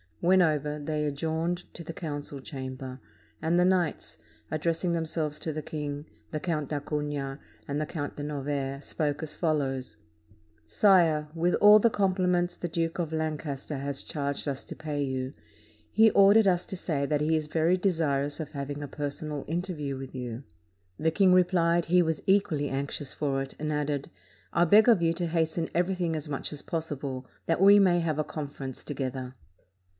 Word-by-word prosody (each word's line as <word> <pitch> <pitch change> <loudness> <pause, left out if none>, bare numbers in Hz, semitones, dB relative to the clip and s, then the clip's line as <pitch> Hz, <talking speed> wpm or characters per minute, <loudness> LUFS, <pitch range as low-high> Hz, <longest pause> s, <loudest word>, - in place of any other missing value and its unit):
When 185 +2 +5
over, 150 -2 +1
they 150 0 -2
adjourned 160 +4 -1
to 170 - -8
the 165 - -7
council 145 -4 -5
chamber, 130 -1 -7 0.4
and 165 +2 +2
the 180 - +5
knights, 175 - 0 0.3
addressing 165 +3 0
themselves 160 -2 -2
to 160 - -3
the 155 - -3
king, 145 -1 -5 0.3
the 155 - -2
Count 155 -4 -2
d'Acunha 145 -2 -3 0.3
and 145 +1 -1
the - - 0
Count 145 -4 -4
de 145 - -4
Novaire 140 -1 -3
spoke 145 -2 -2
as 155 -1 -6
follows: 140 -6 -1 0.7
"Sire, 170 -7 +4
with 175 +2 +1
all 210 +1 +8
the 235 - +4
compliments 180 -3 +1
the 175 - -4
Duke 165 0 -2
of 165 -3 -2
Lancaster 155 -2 -3
has 140 0 -3
charged 140 -2 -3
us 140 -1 -2
to - - -8
pay 150 -2 -3
you, 130 0 -3 0.6
he 220 +1 +6
ordered 200 +2 +6
us 180 -2 +2
to 190 - -4
say 150 -6 -1
that 150 0 0
he 160 +2 +2
is 155 -1 -1
very 165 +3 +2
desir 160 -7 +1
ous 145 +2 -3
of 155 -2 -5
having 140 0 -5
a - - -4
personal 145 +1 -4
interview 160 -5 -3
with 135 0 -8
you." 125 0 -5 0.6
The 160 - +2
king 190 +2 +4
replied, 175 -2 +3
he 180 +1 +4
was 160 -1 -2
equally 190 -8 +2
anxious 140 +1 -3
for 135 -2 -1
it, 135 - -6
and 155 0 -2
added, 145 -1 -1 0.4
"I 170 - +3
beg 210 +7 +6
of 220 -7 +5
you 165 0 +3
to 170 0 -2
hasten 160 0 0
everything 175 -1 +1
as 155 -1 -4
much 140 - -3
as 145 - -5
possible, 140 -5 -4 0.2
that 165 +2 +1
we 200 +1 +8
may 180 -3 +4
have 160 -3 -1
a - - +2
conference 140 -4 -6
together." 130 -2 -4
155 Hz, 180 wpm, -28 LUFS, 145-170 Hz, 0.7 s, all